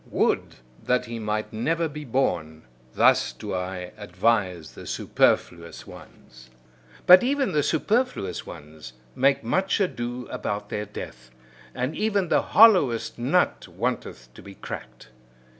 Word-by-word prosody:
Would - - 0 0.3
that 125 0 0
he 115 -1 -6
might 105 0 -3
never 165 +9 0
be 150 0 -8
born! 85 - -1 0.3
Thus - - +4
do - - -7
I 90 -1 -4
advise 95 -3 -1
the - - -11
superfluous 85 -1 0
ones. 60 0 -15 0.6
But 180 +1 +9
even 270 -3 0
the 150 -3 +2
superfluous 205 - -1
ones 75 -3 -11 0.2
make 135 +1 +2
much 185 - 0
ado 125 -9 -2
about 105 0 -4
their 105 - -3
death, 65 -10 -9 0.5
and 130 +5 -2
even 200 -5 0
the - - +3
hollowest 180 - +4
nut 140 +10 +1
wanteth - - -4
to - - -13
be 100 -1 -12
cracked. - - -9
115 Hz, 130 wpm, -25 LUFS, -, 0.6 s, But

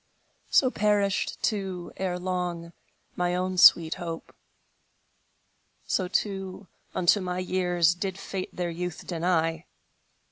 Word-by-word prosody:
So 255 -2 +4
perished, 205 -3 0
too, 190 -5 -2
erelong, 180 -2 -3 0.4
My 180 0 0
own 185 0 -1
sweet 165 -2 +7
hope; 165 -1 -6 1.5
So 185 - 0
too, 195 0 -2 0.3
unto 185 +3 +3
my 180 -1 -3
years 180 -2 +2
Did 190 +1 -4
Fate 190 -1 -5
their 175 -1 -3
youth 175 0 -5
deny. 165 -1 0
180 Hz, 105 wpm, -27 LUFS, 175-190 Hz, 1.5 s, sweet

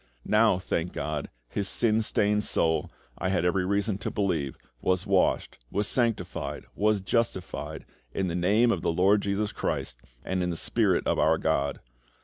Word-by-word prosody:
Now, 110 -2 +4
thank 90 -2 -2
GOD, 75 0 -3 0.2
his 100 +9 -2
sin 110 -2 +2
stained 105 -1 +1
soul, 80 -5 +1 0.3
I 90 - 0
had 90 -2 +1
every 90 +1 +2
reason 100 0 0
to - - -3
believe, 85 -10 -1 0.2
was 95 +1 +1
washed, 100 - +1
was 105 +1 -1
sanctified, 90 - -1
was 105 -1 +2
justified, 105 -2 -2 0.3
in 95 - -1
the 85 - -2
Name 105 +7 +3
of 90 - -1
the - - +1
LORD 95 +5 +4
JESUS 100 +1 -1
CHRIST - - -3 0.2
and 95 0 -1
in 90 - 0
the 85 - -3
SPIRIT 100 -4 +1
of - - +1
our 80 +1 +4
GOD. 70 -3 0
95 Hz, 165 wpm, -27 LUFS, 85-105 Hz, 0.3 s, Now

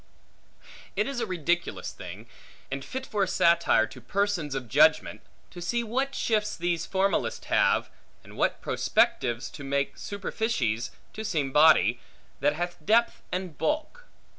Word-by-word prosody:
It - - +1
is 275 -2 -3
a 230 - -2
ridiculous 175 -1 -1
thing, - - -9 0.5
and 135 0 -3
fit 260 0 -5
for 210 -5 -2
a 195 - +3
satire 170 -10 +4
to 130 - -12
persons 180 - -1
of 130 -3 -4
judgment, - - +3 0.3
to 175 - -9
see 235 +7 -1
what 265 +5 -1
shifts 210 -2 0
these 170 -1 -1
formalists 195 +1 0
have, - - +2 0.4
and - - -14
what - - 0
prospectives 120 0 +1
to 145 - -9
make 140 0 -1
superficies 190 - -2 0.2
to 220 - -6
seem 155 -11 -1
body, 140 - +5 0.4
that 145 +2 +2
hath 175 +1 -4
depth 230 +6 +3
and 180 -5 -4
bulk. 315 - -2
175 Hz, 145 wpm, -27 LUFS, 140-215 Hz, 0.5 s, body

